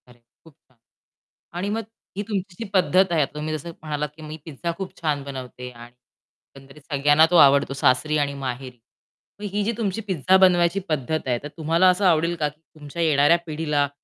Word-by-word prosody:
अरे! 120 Hz, -1 st, -19 dB, 0.2 s
खूप 160 Hz, -3 st, -19 dB
छान. 130 Hz, -, -32 dB, 0.8 s
आणि 185 Hz, +3 st, -2 dB
मग 225 Hz, +1 st, -2 dB, 0.3 s
ही 205 Hz, -, -2 dB
तुमची 195 Hz, -3 st, -3 dB
जी 230 Hz, -, -4 dB
पद्धत 185 Hz, 0 st, +3 dB
आहे. 165 Hz, -, +2 dB
आता 135 Hz, -, -2 dB
तुम्ही 155 Hz, +1 st, -3 dB
जसं 155 Hz, +3 st, -8 dB
म्हणालात, 150 Hz, -1 st, -3 dB
की 160 Hz, -, -12 dB
मी 155 Hz, 0 st, -7 dB
पिझ्झा 165 Hz, +2 st, -4 dB
खूप 190 Hz, -1 st, -6 dB
छान 150 Hz, -4 st, -1 dB
बनवते. 125 Hz, -2 st, -8 dB
आणि 120 Hz, 0 st, -13 dB, 0.6 s
एकंदरीत 135 Hz, +2 st, -15 dB
सगळ्यांना 145 Hz, +3 st, +5 dB
तो 175 Hz, -, +3 dB
आवडतो, 140 Hz, -3 st, +5 dB
सासरी 140 Hz, +3 st, +2 dB
आणि 140 Hz, -1 st, 0 dB
माहेरी. 130 Hz, -2 st, -6 dB, 0.6 s
मग -, -, -7 dB
ही 205 Hz, +1 st, 0 dB
जी 225 Hz, -, 0 dB
तुमची 210 Hz, -2 st, -1 dB
पिझ्झा 185 Hz, -1 st, +3 dB
बनवायची 180 Hz, 0 st, +4 dB
पद्धत 155 Hz, 0 st, -1 dB
आहे, 120 Hz, -1 st, +1 dB
तर 145 Hz, -, -6 dB
तुम्हाला 165 Hz, +3 st, +3 dB
असं 185 Hz, +2 st, +2 dB
आवडेल 170 Hz, -1 st, +3 dB
का 150 Hz, -3 st, 0 dB
की 150 Hz, +2 st, -16 dB
तुमच्या 150 Hz, +2 st, -6 dB
येणाऱ्या 150 Hz, +1 st, +4 dB
पिढीला 150 Hz, -2 st, 0 dB
155 Hz, 190 wpm, -23 LUFS, 140-175 Hz, 0.8 s, सगळ्यांना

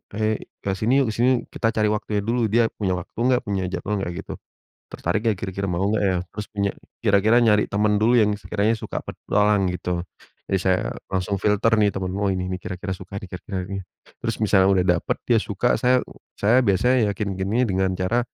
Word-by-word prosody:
hei 110 Hz, 0 st, 0 dB, 0.2 s
ke 95 Hz, -, 0 dB
sini 130 Hz, +5 st, +3 dB
yuk 110 Hz, -, -1 dB
ke -, -, -6 dB
sini 120 Hz, -, +4 dB, 0.2 s
yuk?" -, -, -22 dB
Kita 115 Hz, -, +2 dB
cari 105 Hz, -1 st, +2 dB
waktunya 105 Hz, -1 st, -1 dB
dulu. 115 Hz, 0 st, +1 dB
Dia 115 Hz, +3 st, +3 dB
punya 95 Hz, -3 st, -1 dB
waktu 90 Hz, -, -8 dB
enggak, 125 Hz, +1 st, +3 dB
punya 95 Hz, -3 st, -2 dB
jadwal 100 Hz, +2 st, -3 dB
enggak, 90 Hz, -2 st, -3 dB
gitu. -, -, -8 dB, 0.5 s
Tertarik 95 Hz, +6 st, -2 dB
enggak 110 Hz, -5 st, +1 dB
kira-kira, 100 Hz, 0 st, -4 dB
mau 95 Hz, +2 st, 0 dB
enggak, 105 Hz, 0 st, +1 dB
ya? 95 Hz, -2 st, +2 dB, 0.2 s
Terus 105 Hz, -, -4 dB
punya 100 Hz, -1 st, 0 dB, 0.3 s
kira-kira 110 Hz, +2 st, +4 dB
nyari 105 Hz, -3 st, +4 dB
teman 105 Hz, +1 st, +1 dB
dulu 110 Hz, +3 st, +3 dB
yang 105 Hz, -, +4 dB
sekiranya 105 Hz, +3 st, 0 dB
suka -, -, -5 dB
petualang, 105 Hz, -3 st, +1 dB
gitu. 90 Hz, -1 st, -3 dB, 0.4 s
Jadi, 95 Hz, -, 0 dB
saya 95 Hz, -1 st, +1 dB, 0.2 s
langsung 95 Hz, +1 st, -2 dB
filter 105 Hz, +2 st, +2 dB
nih 105 Hz, -, +4 dB
teman-temen, 95 Hz, 0 st, -3 dB
"Oh, 100 Hz, -, +1 dB
ini 95 Hz, -1 st, -1 dB
nih, 90 Hz, -, -4 dB
kira-kira 90 Hz, 0 st, -5 dB
suka 95 Hz, +1 st, -8 dB
nih, 100 Hz, -2 st, -8 dB
kira-kira 95 Hz, 0 st, -5 dB
yang 90 Hz, -, -11 dB
ini." -, -, -9 dB, 0.4 s
Terus -, -, -2 dB
misalnya 95 Hz, -2 st, +4 dB
udah 90 Hz, -, +2 dB, 0.2 s
dapat -, -, -2 dB
dia 115 Hz, -2 st, +3 dB
suka, 105 Hz, +4 st, 0 dB
saya 125 Hz, 0 st, +3 dB, 0.3 s
saya 115 Hz, +5 st, +4 dB
biasanya 120 Hz, +2 st, +3 dB
yakinkannya 100 Hz, +3 st, 0 dB
dengan 95 Hz, -3 st, 0 dB
cara, 95 Hz, +7 st, +1 dB
100 Hz, 205 wpm, -23 LUFS, 95-110 Hz, 0.5 s, sini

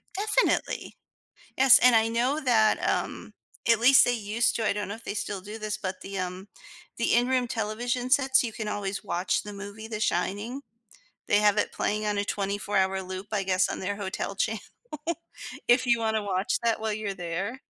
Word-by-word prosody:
Definitely. 420 Hz, +1 st, 0 dB, 0.6 s
Yes, 265 Hz, 0 st, +8 dB
and 250 Hz, -1 st, +5 dB
I 225 Hz, 0 st, +4 dB
know 250 Hz, +6 st, 0 dB
that, 225 Hz, -5 st, +3 dB
um, -, -, -2 dB, 0.3 s
at 230 Hz, -2 st, +5 dB
least 260 Hz, +3 st, +7 dB
they 245 Hz, -, +2 dB
used 225 Hz, +1 st, 0 dB
to, 225 Hz, -2 st, -1 dB
I -, -, +3 dB
don't 205 Hz, -1 st, -4 dB
know 205 Hz, -, -4 dB
if 230 Hz, -, -13 dB
they -, -, -4 dB
still 205 Hz, -2 st, -3 dB
do 210 Hz, +3 st, -8 dB
this, 215 Hz, -1 st, -3 dB
but 185 Hz, -1 st, -5 dB
the, 195 Hz, 0 st, -6 dB
um 185 Hz, +2 st, -5 dB, 0.5 s
the 230 Hz, -, +2 dB
in-room 245 Hz, 0 st, +2 dB
television 240 Hz, +3 st, -2 dB
sets, 265 Hz, -2 st, +4 dB
you 225 Hz, -, -3 dB
can 215 Hz, -1 st, -5 dB
always 200 Hz, -1 st, -3 dB
watch 180 Hz, +2 st, -1 dB
the 210 Hz, -, -8 dB
movie, 205 Hz, +2 st, -8 dB
The 215 Hz, -1 st, -5 dB
Shining, 205 Hz, +9 st, -1 dB, 0.7 s
they 205 Hz, -, +4 dB
have 210 Hz, 0 st, +3 dB
it -, -, +1 dB
playing 210 Hz, +1 st, -1 dB
on 205 Hz, -1 st, 0 dB
a 200 Hz, -, 0 dB
24 200 Hz, 0 st, -2 dB
hour 190 Hz, 0 st, +1 dB
loop, 185 Hz, +2 st, -7 dB
I 200 Hz, -2 st, 0 dB
guess, 185 Hz, 0 st, +2 dB
on -, -, -4 dB
their 200 Hz, +2 st, -2 dB
hotel 195 Hz, 0 st, -4 dB
channel, 215 Hz, +1 st, -1 dB, 1.1 s
if 250 Hz, +2 st, +4 dB
you 235 Hz, -1 st, +4 dB
wanna 220 Hz, -1 st, 0 dB
watch 190 Hz, 0 st, -1 dB
that 230 Hz, -2 st, +1 dB
while 220 Hz, -1 st, -2 dB
you're 210 Hz, -2 st, -3 dB
there. 190 Hz, +8 st, -4 dB
215 Hz, 195 wpm, -27 LUFS, 200-235 Hz, 1.1 s, Yes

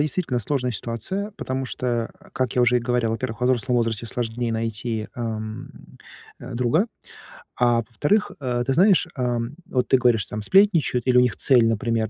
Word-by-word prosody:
действительно 150 Hz, -3 st, 0 dB
сложная 125 Hz, +2 st, -1 dB
ситуация, 120 Hz, -, -3 dB
потому 130 Hz, -8 st, -4 dB
что, 125 Hz, 0 st, -5 dB
э, 120 Hz, -2 st, 0 dB, 0.2 s
как 130 Hz, -1 st, -1 dB
я 125 Hz, -, +3 dB
уже 125 Hz, +1 st, +4 dB
и 120 Hz, -, +1 dB
говорил, 120 Hz, -1 st, 0 dB
во-первых, 115 Hz, 0 st, -4 dB
во 125 Hz, -, +2 dB
взрослом 125 Hz, 0 st, +1 dB
возрасте 115 Hz, -1 st, 0 dB
сложнее 120 Hz, 0 st, -3 dB
найти, 115 Hz, 0 st, -3 dB
ам, 110 Hz, -2 st, -5 dB, 0.7 s
а, 120 Hz, 0 st, -8 dB
друга. 125 Hz, -, +2 dB, 0.7 s
А 120 Hz, -1 st, +3 dB
во-вторых, 145 Hz, -, 0 dB
э, 125 Hz, -3 st, -1 dB
ты 135 Hz, -, +1 dB
знаешь, 190 Hz, +2 st, +4 dB
ам, 125 Hz, 0 st, -2 dB
вот 125 Hz, -2 st, 0 dB
ты 130 Hz, -, +5 dB
говоришь, 120 Hz, -4 st, +2 dB
там 105 Hz, -, -5 dB
сплетничают 170 Hz, -, +3 dB
или 125 Hz, -1 st, +4 dB
у -, -, +7 dB
них 125 Hz, -2 st, +1 dB
цель, 120 Hz, -4 st, +4 dB
например 115 Hz, -1 st, 0 dB
120 Hz, 180 wpm, -23 LUFS, 115-130 Hz, 0.7 s, у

